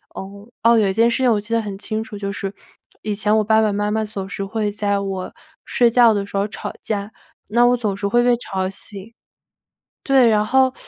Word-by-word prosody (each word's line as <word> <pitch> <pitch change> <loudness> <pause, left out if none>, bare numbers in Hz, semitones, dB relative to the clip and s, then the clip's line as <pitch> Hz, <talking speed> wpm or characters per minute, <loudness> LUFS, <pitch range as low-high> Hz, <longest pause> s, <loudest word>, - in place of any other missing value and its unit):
呃， - - -5 0.4
哦， 230 0 +6
有 210 -3 +3
一 - - -1
件 230 +3 +3
事 235 - 0
情 255 -2 +3
我 215 - +2
记 210 +3 -6
得 230 - +2
很 205 -2 -6
清 215 +2 -4
楚， 210 - -9
就 200 -1 -4
是 195 -1 -5 0.5
以 210 - -2
前 210 +1 +1
我 215 - +2
爸 220 +1 +3
爸 215 - +2
妈 205 +1 -1
妈 220 +1 0
总 205 -3 -6
是 195 0 -5
会 210 +1 -2
在 205 -1 -1
我 195 -2 -4 0.3
睡 240 -1 +3
觉 235 -1 +5
的 200 -1 -1
时 200 - -11
候 200 +1 +1
吵 210 - -7
架， 205 0 -3 0.4
那 235 +3 +3
我 245 0 +3
总 210 -5 -2
是 200 +1 -2
会 240 +4 +3
被 245 0 +4
吵 190 -5 -3
醒 200 +2 -10 0.9
对， 265 -3 +5
然 210 -1 +3
后 260 +3 +3
210 Hz, 250 characters per minute, -20 LUFS, 200-230 Hz, 0.9 s, 哦